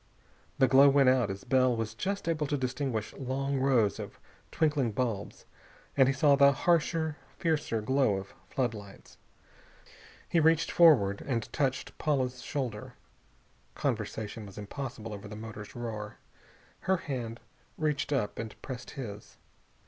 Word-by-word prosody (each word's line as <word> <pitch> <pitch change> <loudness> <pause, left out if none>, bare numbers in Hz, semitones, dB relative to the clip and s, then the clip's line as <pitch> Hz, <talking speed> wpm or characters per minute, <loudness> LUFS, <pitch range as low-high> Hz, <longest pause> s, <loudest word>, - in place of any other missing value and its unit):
The 130 - +5
glow 135 +3 +7
went 135 -1 +5
out 130 -4 +3
as 95 0 -5
Bell 130 -2 +3
was 115 -1 -3
just 195 - -3
able 155 -3 0
to 145 - 0
distinguish 130 -4 -2
long 135 +1 -2
rows 125 -8 +2
of - - -8 0.3
twinkling 150 -8 +1
bulbs, 110 -4 -3 0.5
and 135 -2 +5
he 135 - +3
saw 140 +1 +5
the 140 0 +7
harsher, 160 +1 +1 0.2
fiercer 155 -9 0
glow 130 -3 +2
of 95 0 -6 0.2
floodlights. 110 -6 -4 1.1
He 170 - +2
reached 160 0 +3
forward 120 - +5
and 120 -5 -3
touched 135 -2 -1
Paula's 130 -4 0
shoulder. 125 -7 -4 0.8
Conversation 110 0 -3
was 100 - -13
impossible 115 +1 -6
over 100 0 -8
the 105 - -8
motor's 110 +3 -8
roar. 110 -3 -5 0.6
Her 190 0 +1
hand 120 -8 -5 0.4
reached 150 -2 -1
up 120 -8 -1
and 110 -1 -6
pressed 130 -2 -6
his. 105 -6 -7
130 Hz, 140 wpm, -30 LUFS, 110-140 Hz, 1.1 s, glow